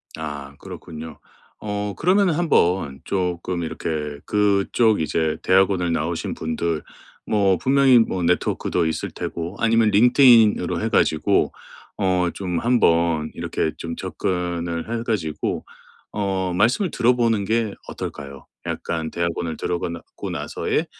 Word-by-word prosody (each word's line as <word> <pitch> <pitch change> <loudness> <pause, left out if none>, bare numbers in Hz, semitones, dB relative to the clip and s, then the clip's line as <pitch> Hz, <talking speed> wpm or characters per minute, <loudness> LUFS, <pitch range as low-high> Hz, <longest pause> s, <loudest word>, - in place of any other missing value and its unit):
아 75 -3 -7
그렇군요. 80 -1 -9 0.4
어 105 -1 -3
그러면은 185 0 +3
한번 90 - +1
쪼끔 90 -2 -2
이렇게 75 -2 -4
그쪽 105 +1 +2
이제 80 0 0
대학원을 95 -2 +3
나오신 80 +1 -2
분들 80 0 -2 0.4
뭐 100 -3 +2
분명히 135 +2 +5
뭐 95 -5 0
네트워크도 90 0 0
있을 80 - -2
테고 85 +3 -5
아니면 115 -1 +3
링크드인으로 115 0 +5
해 - - -1
가지고 80 - +2 0.5
어 90 -2 +1
좀 90 -3 -3
한번 85 -9 +2
이렇게 80 - -2
좀 85 0 -5
접근을 85 +1 -3
해 - - -5
가지고 90 -10 -2 0.5
어 95 -3 -1
말씀을 120 - +2
들어보는 115 -3 +2
게 110 0 0
어떨까요? 70 -1 -7 0.2
약간 80 -2 -3
대학원을 85 -1 -2
들어가고 85 -1 -4
나서의 - - -2
90 Hz, 280 characters per minute, -22 LUFS, 80-110 Hz, 0.5 s, 분명히